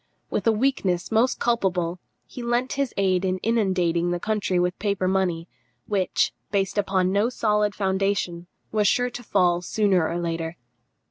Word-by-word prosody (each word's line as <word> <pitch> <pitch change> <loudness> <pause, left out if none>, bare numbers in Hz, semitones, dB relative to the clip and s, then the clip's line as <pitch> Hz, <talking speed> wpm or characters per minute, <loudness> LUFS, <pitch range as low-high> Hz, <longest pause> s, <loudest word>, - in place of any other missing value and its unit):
With - - -1
a - - +6
weakness 210 -7 0
most 230 +4 +2
culpable, 185 -7 0 0.3
he 250 - -9
lent 240 +2 0
his 275 -2 -1
aid 190 -2 +2
in 185 -1 0
inundating 185 -6 +1
the 175 0 -1
country 210 -2 -1
with 180 0 0
paper 200 -3 0
money, 180 -3 0 0.4
which, 195 -3 0 0.2
based 200 0 0
upon 190 -2 +1
no 205 +4 +2
solid 210 -4 +1
foundation, 190 -3 -1 0.2
was 210 -1 +2
sure 245 +2 +2
to 245 - -7
fall, 180 -6 +2
sooner 190 -3 +1
or 170 - -2
later. 165 -1 -3
195 Hz, 155 wpm, -24 LUFS, 180-215 Hz, 0.4 s, a